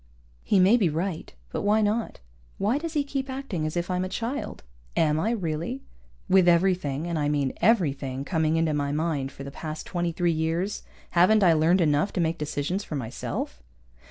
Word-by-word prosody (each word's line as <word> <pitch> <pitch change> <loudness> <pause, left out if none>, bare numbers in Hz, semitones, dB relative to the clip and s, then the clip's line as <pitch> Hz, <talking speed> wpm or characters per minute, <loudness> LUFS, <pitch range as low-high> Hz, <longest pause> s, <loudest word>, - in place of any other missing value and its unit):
_ - - -32 0.4
He 200 - +2
may 195 +6 +6
be 195 -8 +2
right, 165 +2 -3 0.2
but - - -2
why 215 +1 +3
not? 215 - -1 0.4
Why 225 +8 +1
does 330 0 -5
he 295 -2 +1
keep 275 -1 -4
acting 260 - -3
as 155 - -4
if 175 +1 -2
I'm 180 0 0
a 185 - -3
child? 235 +8 -4 0.3
Am 155 -1 +3
I, 210 - +1
really? 195 - -3 0.4
With 185 -1 +5
everything 170 -4 +2
(and 170 -2 -2
I 145 -1 +1
mean 140 -3 0
everything) 140 - +1
coming 160 -1 +1
into 165 -1 +1
my 145 -1 -1
mind 150 -3 -1
for 140 - -9
the 140 - -7
past 155 +1 -6
twenty 175 -1 -1
three 175 +1 +1
years, 165 +5 -1 0.3
haven't 190 +5 +5
I 175 -3 +6
learned 165 +4 +3
enough 150 +3 +2
to - - -2
make 165 0 0
decisions 150 +6 -2
for 155 - -6
myself? 110 - -4
170 Hz, 195 wpm, -26 LUFS, 155-200 Hz, 0.4 s, may